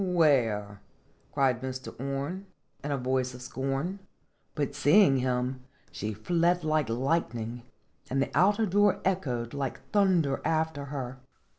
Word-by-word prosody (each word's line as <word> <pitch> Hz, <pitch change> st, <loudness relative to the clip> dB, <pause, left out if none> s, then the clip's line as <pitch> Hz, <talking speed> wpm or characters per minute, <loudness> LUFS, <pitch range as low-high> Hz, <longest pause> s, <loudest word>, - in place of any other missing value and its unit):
"Where?" 120 Hz, -, +2 dB, 0.5 s
cried 130 Hz, -4 st, +1 dB
Mr. 130 Hz, 0 st, -5 dB
Orne, 140 Hz, +9 st, -4 dB, 0.4 s
in 145 Hz, -, -3 dB
a 140 Hz, -, 0 dB
voice 130 Hz, 0 st, -1 dB
of 125 Hz, -, -9 dB
scorn. 135 Hz, +9 st, -3 dB, 0.6 s
But, 145 Hz, -2 st, -1 dB
seeing 145 Hz, +1 st, +5 dB
him, 125 Hz, 0 st, -1 dB, 0.3 s
she 105 Hz, +2 st, -4 dB
fled 170 Hz, -, +1 dB
like 155 Hz, -4 st, +1 dB
light 130 Hz, +2 st, 0 dB
ning, 115 Hz, +1 st, -5 dB, 0.5 s
and 135 Hz, -, 0 dB
the 135 Hz, -, 0 dB
outer 205 Hz, +7 st, +4 dB
door 205 Hz, +1 st, +3 dB
echoed 130 Hz, -12 st, -1 dB
like 140 Hz, -3 st, -3 dB
thunder 180 Hz, -9 st, +2 dB
after 160 Hz, -3 st, 0 dB
her. 135 Hz, -2 st, -5 dB
140 Hz, 135 wpm, -29 LUFS, 125-170 Hz, 0.6 s, seeing